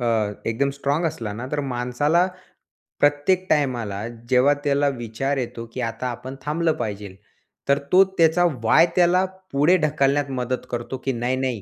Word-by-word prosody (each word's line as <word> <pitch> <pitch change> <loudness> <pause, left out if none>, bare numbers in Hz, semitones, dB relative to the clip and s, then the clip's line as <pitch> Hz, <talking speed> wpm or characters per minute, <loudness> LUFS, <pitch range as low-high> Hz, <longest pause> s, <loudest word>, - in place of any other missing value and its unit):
अ, 110 -3 +1
एकदम 125 +5 0
स्ट्राँग 140 +4 -1
असला 115 -9 -4
ना, 115 +5 -6
तर 150 - 0
माणसाला 135 +6 +1 0.7
प्रत्येक 145 +6 +2
टाईमाला 120 -9 0 0.3
जेव्हा 130 +2 +5
त्याला 145 0 +2
विचार 120 +5 -2
येतो 120 -2 -4
की - - -4
आता 115 +2 -3
आपण 125 +2 -6
थांबलं 160 +3 0
पाहिजेल. 100 -2 -5 0.5
तर 140 - +5
तो 185 +1 +8
त्याचा 165 +1 +4 0.2
वाय 155 +9 +6
त्याला 180 +1 +4 0.3
पुढे 150 +6 +4
ढकलण्यात 145 -3 +1
मदत 125 -1 -3
करतो 120 +2 -4
की 135 - +1
नाही 120 +2 -1
नाही 130 -5 -2
135 Hz, 155 wpm, -23 LUFS, 120-150 Hz, 0.7 s, तो